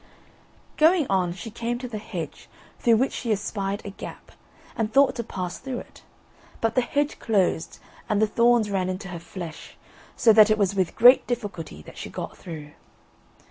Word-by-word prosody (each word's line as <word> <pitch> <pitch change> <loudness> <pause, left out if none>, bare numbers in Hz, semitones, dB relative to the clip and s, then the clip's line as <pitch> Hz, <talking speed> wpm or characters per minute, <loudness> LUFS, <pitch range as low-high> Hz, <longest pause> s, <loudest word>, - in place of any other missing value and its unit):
Going 320 0 +5
on, 185 -2 +2
she 185 +5 -7
came 235 +2 -3
to 250 +1 -6
the 220 -3 -5
hedge, 175 -7 -7 0.3
through 230 -2 +4
which 265 +4 +1
she 235 - -3
espied 200 -1 -2
a 200 - -5
gap, - - -10 0.4
and 225 -1 -1
thought 275 +3 +5
to 235 - -2
pass 180 -5 -5
through 260 -2 -5
it; - - -11 0.6
but 225 0 0
the 255 - +3
hedge 290 +4 -1
closed, 195 -6 0 0.3
and 210 - +2
the, 220 - +5
thorns 235 0 +3
ran 185 -2 0
into 185 +1 -5
her 175 -2 -6
flesh, 165 -1 -9 0.4
so 225 - +5
that 215 0 +7
it 215 - +3
was 200 -2 +1
with 190 -3 0
great 245 +3 +7
difficulty 180 - -5
that - - -12
she - - -6
got - - -6
through. 150 -4 -9
210 Hz, 180 wpm, -25 LUFS, 185-235 Hz, 0.6 s, that